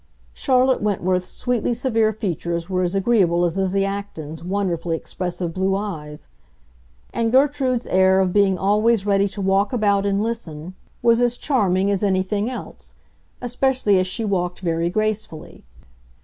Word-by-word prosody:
Charlotte 260 Hz, -1 st, +2 dB
Wentworth's 185 Hz, -3 st, 0 dB
sweetly 245 Hz, -1 st, -1 dB
severe 225 Hz, -3 st, +1 dB
features 170 Hz, -5 st, -3 dB
were 185 Hz, -1 st, -1 dB
as 180 Hz, +1 st, -1 dB
agreeable 190 Hz, -5 st, +2 dB
as 170 Hz, 0 st, -1 dB
Lizzie 195 Hz, 0 st, 0 dB
Acton's 165 Hz, -6 st, -6 dB
wonderfully 175 Hz, -3 st, -1 dB
expressive 175 Hz, -1 st, -4 dB
blue 190 Hz, +1 st, 0 dB
eyes; 155 Hz, -8 st, -6 dB, 0.9 s
and 230 Hz, -1 st, 0 dB
Gertrude's 265 Hz, -2 st, +2 dB
air 190 Hz, 0 st, +3 dB
of 185 Hz, -2 st, +1 dB
being 200 Hz, -2 st, +3 dB
always 210 Hz, +2 st, +2 dB
ready 200 Hz, -1 st, +2 dB
to 200 Hz, +1 st, -7 dB
walk 195 Hz, +1 st, +2 dB
about 205 Hz, -5 st, +2 dB
and 200 Hz, 0 st, +1 dB
listen 180 Hz, -8 st, -5 dB, 0.3 s
was 235 Hz, 0 st, +4 dB
as 245 Hz, 0 st, +1 dB
charming 200 Hz, -9 st, +1 dB
as 195 Hz, -, 0 dB
anything 200 Hz, +2 st, 0 dB
else, 255 Hz, -, -9 dB, 0.5 s
especially 245 Hz, -5 st, +2 dB
as 185 Hz, -, 0 dB
she 220 Hz, +4 st, -3 dB
walked 180 Hz, -3 st, -2 dB
very 170 Hz, -1 st, 0 dB
gracefully. 215 Hz, -5 st, -3 dB
195 Hz, 145 wpm, -21 LUFS, 180-225 Hz, 0.9 s, was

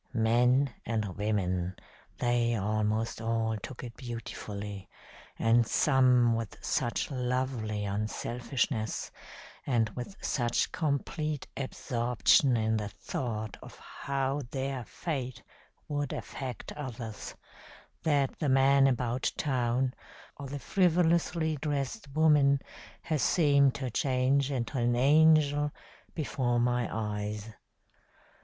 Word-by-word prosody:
Men 125 Hz, +4 st, +3 dB
and 105 Hz, -5 st, -2 dB
women, 95 Hz, -3 st, -1 dB, 0.4 s
they 120 Hz, -1 st, +1 dB
almost 110 Hz, +2 st, -1 dB
all 115 Hz, -1 st, 0 dB
took 130 Hz, -, -8 dB
it 120 Hz, -2 st, -8 dB
beautifully, 105 Hz, -5 st, -6 dB, 0.5 s
and 115 Hz, 0 st, +3 dB
some 125 Hz, -4 st, +4 dB
with 115 Hz, -2 st, -3 dB
such 120 Hz, +3 st, -1 dB
lovely 125 Hz, -5 st, -1 dB
unselfishness, 110 Hz, +3 st, -2 dB, 0.5 s
and 115 Hz, -4 st, +1 dB
with 125 Hz, -, -7 dB
such 120 Hz, -3 st, 0 dB
complete 150 Hz, 0 st, -2 dB
absorption 125 Hz, -1 st, +2 dB
in 110 Hz, 0 st, +1 dB
the 105 Hz, -1 st, -2 dB
thought 110 Hz, -1 st, -4 dB
of -, -, -12 dB
how 140 Hz, +1 st, -2 dB
their 135 Hz, -2 st, -3 dB
fate 130 Hz, -8 st, -4 dB, 0.4 s
would 145 Hz, -2 st, -2 dB
affect 130 Hz, -3 st, -6 dB
others, 120 Hz, -7 st, -6 dB, 0.7 s
that 145 Hz, -4 st, +1 dB
the 150 Hz, -, 0 dB
man 135 Hz, +1 st, +5 dB
about 125 Hz, -1 st, 0 dB
town, 130 Hz, -2 st, 0 dB, 0.4 s
or 140 Hz, -, -7 dB
the 140 Hz, +2 st, -5 dB
frivolously 165 Hz, 0 st, +2 dB
dressed 145 Hz, -, -3 dB
woman 150 Hz, -3 st, +5 dB, 0.4 s
has 155 Hz, -4 st, -1 dB
seemed 140 Hz, -3 st, +4 dB
to 130 Hz, -3 st, -3 dB
change 130 Hz, +2 st, +2 dB
into 130 Hz, -1 st, -2 dB
an 120 Hz, 0 st, +2 dB
angel 145 Hz, +2 st, +5 dB, 0.5 s
before 130 Hz, -6 st, 0 dB
my 120 Hz, 0 st, +1 dB
eyes. 105 Hz, 0 st, -3 dB
125 Hz, 105 wpm, -30 LUFS, 115-140 Hz, 0.7 s, man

